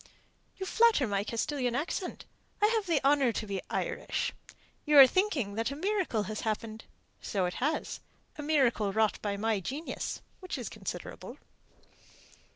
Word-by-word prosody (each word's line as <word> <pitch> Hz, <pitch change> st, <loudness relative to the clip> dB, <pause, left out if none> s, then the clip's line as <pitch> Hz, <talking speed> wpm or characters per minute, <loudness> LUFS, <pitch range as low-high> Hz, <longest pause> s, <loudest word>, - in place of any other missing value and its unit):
"You 380 Hz, -, -4 dB
flatter 450 Hz, -, +4 dB
my 200 Hz, -2 st, 0 dB
Castilian 245 Hz, +3 st, -1 dB
accent. 330 Hz, +5 st, -3 dB, 0.3 s
I 420 Hz, -, +4 dB
have 435 Hz, -4 st, 0 dB
the 310 Hz, -6 st, +1 dB
honour 275 Hz, -3 st, +4 dB
to 215 Hz, -, -3 dB
be 195 Hz, -2 st, -3 dB
Irish. -, -, -2 dB, 0.5 s
You 300 Hz, -1 st, +2 dB
were 275 Hz, -2 st, +12 dB
thinking 275 Hz, -, 0 dB
that 225 Hz, +3 st, -1 dB
a 280 Hz, -, -5 dB
miracle 370 Hz, -, 0 dB
had 215 Hz, +1 st, -4 dB
happened. 220 Hz, 0 st, -3 dB, 0.4 s
So 190 Hz, -3 st, -1 dB
it 180 Hz, -, -2 dB
has 300 Hz, +5 st, -1 dB, 0.4 s
a 300 Hz, -, -6 dB
miracle 265 Hz, -9 st, +2 dB
wrought 220 Hz, +1 st, +1 dB
by 200 Hz, -1 st, -2 dB
my 220 Hz, 0 st, +1 dB
genius, 275 Hz, -, -4 dB, 0.2 s
which 370 Hz, -, -5 dB
is -, -, -5 dB
considerable." -, -, -7 dB
260 Hz, 155 wpm, -30 LUFS, 215-315 Hz, 0.5 s, were